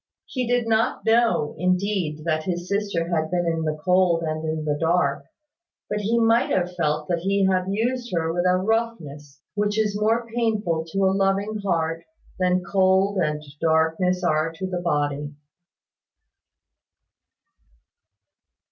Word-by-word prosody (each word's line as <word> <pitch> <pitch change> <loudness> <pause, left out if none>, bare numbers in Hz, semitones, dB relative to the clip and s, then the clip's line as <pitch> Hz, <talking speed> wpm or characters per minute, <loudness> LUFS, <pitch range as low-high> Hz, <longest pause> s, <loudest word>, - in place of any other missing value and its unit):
He 255 -3 -3
did 245 -1 +1
not 225 0 +1
know 225 -9 +2
indeed 180 -4 0
that 155 -1 0
his 175 -1 -3
sister 200 -4 -1
had 160 -2 0
been 175 0 0
in 165 -1 -1
the 155 0 -1
cold 180 -2 +3
and 155 0 -3
in 155 -1 -3
the 150 -1 0
dark; 165 -4 +1 0.7
but 210 - 0
he 225 +3 +1
might 230 +2 +3
have 180 -1 0
felt 150 -3 -1
that 175 -1 0
he 195 +2 +1
had 185 -1 +2
used 240 +4 -1
her 165 -1 0
with 175 +1 0
a 180 0 +3
roughness 170 -10 -3
which 205 0 -1
is 210 -2 +1
more 230 +2 +1
painful 210 -9 0
to 195 +3 0
a 190 - +3
loving 195 +2 0
heart 165 -4 -1 0.4
than 180 0 +2
cold 190 +1 +2
and 150 -3 -1 0.2
darkness 165 +3 +1
are 155 -1 +1
to 190 +3 -5
the 180 -1 -3
body. 145 -3 -1
180 Hz, 145 wpm, -23 LUFS, 160-205 Hz, 0.7 s, cold